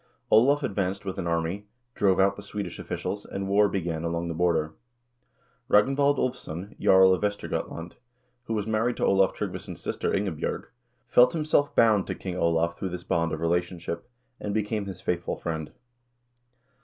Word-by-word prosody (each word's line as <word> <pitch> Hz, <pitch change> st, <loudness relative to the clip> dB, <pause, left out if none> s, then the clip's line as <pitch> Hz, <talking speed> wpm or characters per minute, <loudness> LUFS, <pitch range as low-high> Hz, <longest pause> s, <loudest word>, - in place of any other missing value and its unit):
Olav 140 Hz, +7 st, +5 dB
advanced 100 Hz, -4 st, -2 dB
with 95 Hz, 0 st, -4 dB
an 85 Hz, -, -2 dB
army, 85 Hz, +5 st, -1 dB, 0.3 s
drove 95 Hz, -4 st, +2 dB
out 100 Hz, +1 st, +4 dB
the 100 Hz, -, -9 dB
Swedish 100 Hz, -3 st, -6 dB
officials, 100 Hz, +1 st, -4 dB
and 95 Hz, 0 st, -5 dB
war 100 Hz, +1 st, +4 dB
began 85 Hz, -4 st, -2 dB
along 85 Hz, 0 st, -2 dB
the -, -, -2 dB
border. 80 Hz, -2 st, +1 dB, 1.0 s
Ragnvald 140 Hz, +6 st, +4 dB
Ulvsson, 105 Hz, -8 st, -3 dB
jarl 95 Hz, 0 st, +6 dB
of 95 Hz, -, -1 dB
Vestergot 105 Hz, 0 st, -2 dB
land, 85 Hz, +1 st, -8 dB, 0.5 s
who 115 Hz, -, -2 dB
was 105 Hz, -2 st, -1 dB
married 110 Hz, +2 st, 0 dB
to -, -, +1 dB
Olav 95 Hz, -1 st, +3 dB
Tryggvason's 90 Hz, -3 st, -5 dB
sister -, -, -2 dB
Ingebj0rg, 95 Hz, -6 st, -2 dB, 0.4 s
felt 125 Hz, +1 st, +5 dB
himself 155 Hz, -3 st, +1 dB
bound 110 Hz, -4 st, +4 dB
to -, -, -3 dB
King 90 Hz, -2 st, -5 dB
Olav 85 Hz, -1 st, +1 dB
through 95 Hz, -, -4 dB
this 90 Hz, 0 st, -6 dB
bond 85 Hz, -1 st, 0 dB
of 80 Hz, -, -4 dB
relationship, 85 Hz, +2 st, -2 dB, 0.3 s
and 105 Hz, 0 st, -3 dB
became 105 Hz, -1 st, -1 dB
his 95 Hz, -3 st, -7 dB
faithful 85 Hz, -1 st, -1 dB
friend. 80 Hz, -2 st, -4 dB
95 Hz, 165 wpm, -27 LUFS, 85-105 Hz, 1.0 s, jarl